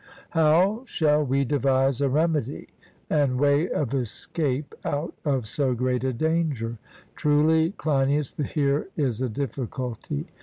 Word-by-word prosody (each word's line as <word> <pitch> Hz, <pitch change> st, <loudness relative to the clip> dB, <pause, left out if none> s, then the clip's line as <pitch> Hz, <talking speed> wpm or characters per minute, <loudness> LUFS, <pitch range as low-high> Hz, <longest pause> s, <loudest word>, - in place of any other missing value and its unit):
How 170 Hz, +8 st, +3 dB
shall 150 Hz, -5 st, +2 dB
we 135 Hz, 0 st, +1 dB
devise 135 Hz, -1 st, +1 dB
a 140 Hz, -, +2 dB
remedy 150 Hz, -2 st, 0 dB, 0.4 s
and 140 Hz, -5 st, +1 dB
way 145 Hz, +4 st, +3 dB
of 135 Hz, -3 st, -1 dB
escape 135 Hz, +3 st, -2 dB
out 145 Hz, +4 st, -2 dB
of 135 Hz, -6 st, 0 dB
so 130 Hz, +2 st, 0 dB
great 125 Hz, +1 st, 0 dB
a 130 Hz, -, +1 dB
danger? 140 Hz, -5 st, -1 dB, 0.4 s
Truly, 160 Hz, +3 st, +3 dB
Cleinias, 140 Hz, -1 st, +1 dB
here 145 Hz, -1 st, 0 dB
is 130 Hz, -6 st, 0 dB
a 130 Hz, -, 0 dB
difficulty. 120 Hz, -, -4 dB
140 Hz, 125 wpm, -25 LUFS, 130-150 Hz, 0.4 s, How